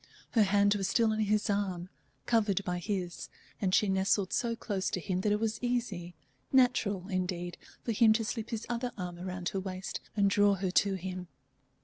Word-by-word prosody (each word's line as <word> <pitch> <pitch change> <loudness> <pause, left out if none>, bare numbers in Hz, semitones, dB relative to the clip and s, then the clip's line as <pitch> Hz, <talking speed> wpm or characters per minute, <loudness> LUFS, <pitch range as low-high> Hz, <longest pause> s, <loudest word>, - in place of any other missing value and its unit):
Her 225 - +4
hand 205 0 +4
was 195 -2 -1
still 225 -2 +3
on 215 - -1
his 210 0 +2
arm, 195 -4 -1 0.4
covered 210 -4 +2
by 180 -2 -2
his, 180 -2 -3 0.3
and 190 -3 +1
she 210 - +4
nestled 190 0 +1
so 235 -1 0
close 200 -4 -2
to - - -2
him 185 +1 -2
that 210 - +1
it 210 - +2
was 220 0 -1
easy, 230 -9 -2 0.4
natural, 225 -8 +3
indeed, 180 -2 -2 0.3
for 235 - -1
him 225 0 +5
to 225 0 0
slip 220 0 -3
his 225 -1 -3
other 240 +1 -2
arm 180 -2 -5
around 180 0 -3
her 195 - -2
waist 190 0 -5 0.2
and 200 -1 +4
draw 205 0 +4
her 190 -1 -2
to 195 +1 +3
him. 185 -1 -5
200 Hz, 195 wpm, -31 LUFS, 185-220 Hz, 0.4 s, him